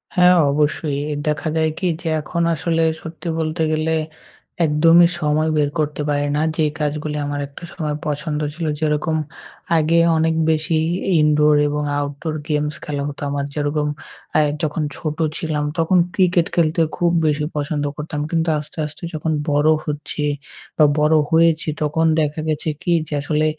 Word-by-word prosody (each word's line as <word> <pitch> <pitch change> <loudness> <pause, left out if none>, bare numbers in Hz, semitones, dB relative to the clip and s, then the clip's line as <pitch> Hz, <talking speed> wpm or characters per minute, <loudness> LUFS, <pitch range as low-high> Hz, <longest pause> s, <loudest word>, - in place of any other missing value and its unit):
হ্যাঁ, 180 0 +6 0.2
অবশ্যই. 145 0 0 0.3
দেখা 150 +1 -1
যায় 160 0 +2
কি 185 - 0
যে, 170 - -5
এখন 170 +3 -3
আসলে 165 +1 0 0.2
সত্যি 165 +2 -8
বলতে 160 +1 -2
গেলে 155 +1 0 0.7
একদমই 165 +3 +6
সময় 155 +1 +1
বের 145 -1 +2
করতে 150 0 -1
পারি 145 0 +1
না। 150 - +1
যেই 155 -2 +1
কাজগুলি 150 0 -2
আমার 145 0 -3
একটা 140 +4 -13
সময় 150 -2 -3
পছন্দ 150 +1 -2
ছিলো, 160 -1 -3
যেরকম 155 +1 0 0.6
আগে 165 +2 +3 0.2
অনেক 160 0 +2 0.2
বেশি 160 +1 0 0.4
i - - +3
indoor 150 0 +4
এবং 150 0 -1 0.2
outdoor 145 +2 -4
games 150 0 0
খেলা 145 -1 -3
হতো। 145 - -7
আমার 140 0 -2
যেরকম 150 0 -1 0.5
অ্যা 155 - +4 0.2
যখন 155 +1 -1
ছোটো 155 +1 -2
ছিলাম 155 -2 -2
তখন 165 +3 +3 0.2
ক্রিকেট 180 -3 +3
খেলতে 165 -1 +2 0.2
খুব 170 -1 +2
বেশি 150 0 +1
পছন্দ 145 0 -2
করতাম। 150 0 -5
কিন্তু 165 0 +1
আস্তে, 150 +2 -11
আস্তে 150 +2 -10
যখন 155 +1 -2 0.2
বড়ো 145 +2 +4
হচ্ছি 150 0 -4 0.5
বা 155 - +6
বড়ো 155 +1 +4
হয়েছি 165 -1 +3
তখন 155 +2 +1 0.2
দেখা 150 +1 -1
গেছে 155 +1 -1
কি? 175 - -1 0.2
যে - - -6
আসলে 155 +1 0
155 Hz, 160 wpm, -20 LUFS, 150-160 Hz, 0.7 s, হ্যাঁ